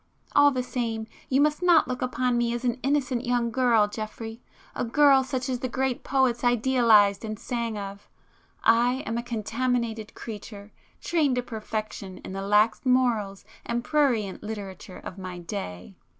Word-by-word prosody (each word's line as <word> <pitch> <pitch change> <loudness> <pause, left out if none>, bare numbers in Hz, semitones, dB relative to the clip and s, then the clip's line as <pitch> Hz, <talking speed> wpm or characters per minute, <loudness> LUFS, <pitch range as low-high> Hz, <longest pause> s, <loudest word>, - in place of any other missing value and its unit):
All 285 - +7
the 255 -3 -2
same, 230 -3 -3 0.2
you 265 - +3
must 300 +2 +2
not 350 -3 +5
look 255 -1 -4
upon 250 -1 0
me 240 0 +1
as 240 +1 -4
an 245 +1 0
innocent 265 -3 0
young 240 -2 0
girl 235 -4 +3
Geoffrey,—a 225 +3 -7
girl 275 +2 +5
such 255 0 -3
as 255 -2 -2
the 255 - -3
great 260 0 -1
poets 260 -3 +1
idealized 235 -5 +4
and 215 -1 -4
sang 235 -2 -3
of,—I 225 +4 -1
am 225 +2 -2
a - - -2
contaminated 230 -1 -2
creature, 210 -2 -9 0.3
trained 305 -6 +1
to 250 - -1
perfection 215 -4 -5
in - - -7
the 195 - -4
lax 210 +3 +3
morals 240 -6 +1 0.2
and 240 0 -2
prurient 245 -11 +1
literature 200 -3 -7
of 185 - -9
my 185 -1 -6
day." 165 - -6
235 Hz, 155 wpm, -26 LUFS, 215-255 Hz, 0.3 s, All